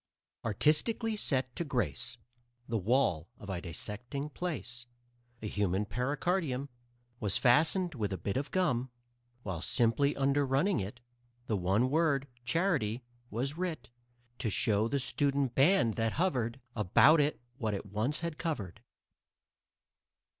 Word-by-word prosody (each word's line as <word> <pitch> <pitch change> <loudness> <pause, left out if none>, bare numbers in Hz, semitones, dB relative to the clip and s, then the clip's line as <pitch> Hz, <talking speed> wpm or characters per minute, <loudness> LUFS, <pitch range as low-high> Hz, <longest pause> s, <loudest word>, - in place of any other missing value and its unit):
Artistically 155 - +1
set 130 -10 0
to - - -1
grace 125 -3 -2 0.5
The 115 -1 0
wall 95 - +1
of 100 - -7
a 90 -2 -3
dissecting 120 - -5
place, 120 - -4 0.6
A - - -2
human 100 -1 0
pericardium 140 - -1 0.5
Was 105 -3 0
fastened 160 +8 +3
with 105 -7 -2
a 95 - -2
bit 95 +4 -3
of 140 +2 -1
gum, 130 -9 +1 0.5
While, 90 -5 -4
simply 130 - +2
underrunning 140 +6 +2
it, 105 +5 -6 0.4
The 110 - 0
one 100 +7 +2
word, 145 -3 +2 0.2
"Charity," 135 - +1 0.3
was 135 +8 -2
writ 160 -10 -3 0.5
To 115 - -1
show 105 +1 +2
the 140 +4 0
student 140 -1 0
band 135 - +4
that 115 -1 +1
hovered 135 -8 0 0.2
About 120 - +6
it 145 +1 0 0.2
what 110 -4 0
it 100 - -5
once 110 - -1
had 170 -2 -4
covered. 130 - -3
125 Hz, 130 wpm, -32 LUFS, 110-150 Hz, 0.6 s, About